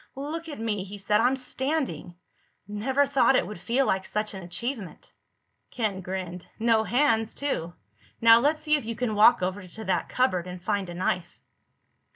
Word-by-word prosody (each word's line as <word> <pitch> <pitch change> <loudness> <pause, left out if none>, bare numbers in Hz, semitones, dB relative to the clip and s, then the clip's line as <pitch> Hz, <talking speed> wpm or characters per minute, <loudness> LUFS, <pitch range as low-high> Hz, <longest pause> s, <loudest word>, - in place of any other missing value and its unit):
"Look 315 +4 -5
at 290 - -7
me," 215 -4 -2
he 200 +1 -9
said. 210 +1 +2
"I'm 255 +2 +3
standing! 260 - -3 0.5
Never 255 +7 +1
thought 275 -1 +3
it - - +3
would 210 -4 -8
feel 255 +8 +1
like 190 -4 0
such 210 0 -2
an 190 - -7
achievement." 200 +3 -5 0.6
Ken 210 -5 -2
grinned. 180 -1 -5
"No 225 -1 +3
hands, 225 -2 +1
too. 175 - -2 0.5
Now 230 0 +8
let's 305 +4 +1
see 305 -1 +1
if 290 - -6
you 230 +1 -4
can 240 -1 -1
walk 215 +1 +6
over 185 +1 -3
to 220 +5 -7
that 180 -3 0
cupboard 185 -9 +1
and 180 0 -7
find 200 0 -2
a 175 - -7
knife." 180 -1 -2
220 Hz, 180 wpm, -26 LUFS, 185-260 Hz, 0.6 s, Now